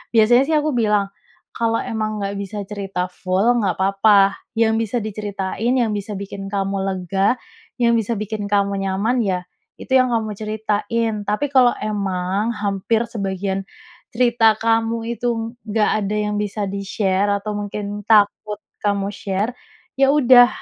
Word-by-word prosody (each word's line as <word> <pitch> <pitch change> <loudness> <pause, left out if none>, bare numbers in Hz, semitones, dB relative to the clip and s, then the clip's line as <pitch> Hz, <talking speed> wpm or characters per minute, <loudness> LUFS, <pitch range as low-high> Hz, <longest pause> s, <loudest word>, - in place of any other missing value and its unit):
biasanya, 235 +3 +6
sih, 315 - +3
aku 300 0 +1
bilang, 210 -4 +1 0.4
"Kalau 230 -1 0
emang 215 -1 -3
nggak 200 0 -3
bisa 200 +1 -6
cerita 195 -3 -3
full, 185 +3 -1 0.2
nggak 190 -3 0
papa. 195 +1 +4 0.2
Yang 225 -1 +3
bisa 240 - -2
diceritain, 210 +2 -2
yang 235 -3 +1
bisa 205 +1 -4
bikin 195 0 -6
kamu 195 0 -1
lega, 195 +4 0 0.5
yang 235 0 +4
bisa 225 +2 -2
bikin 210 0 -4
kamu 200 -1 +1
nyaman, 200 +6 0
ya, 190 -4 0 0.4
itu 260 - -5
yang 255 -1 +5
kamu 220 -2 -1
ceritain. 220 +1 -1
Tapi, 210 +8 0
kalau 255 -2 +6
emang 200 0 -1
hampir 205 +3 0
sebagian 195 -3 -3 0.5
cerita 230 -2 +4
kamu 225 +1 +1 0.2
itu 245 - -1 0.4
nggak 215 0 +2 0.2
ada 205 +2 -2
yang 210 0 -1
bisa 210 0 -3
di-share, 195 0 -1
atau 200 +1 -4
mungkin 205 0 -4
takut 210 -1 +3 0.2
kamu 200 -1 0
share, 205 0 -2 0.5
ya, 270 0 +5
udah 250 -4 +7
210 Hz, 145 wpm, -20 LUFS, 195-225 Hz, 0.5 s, udah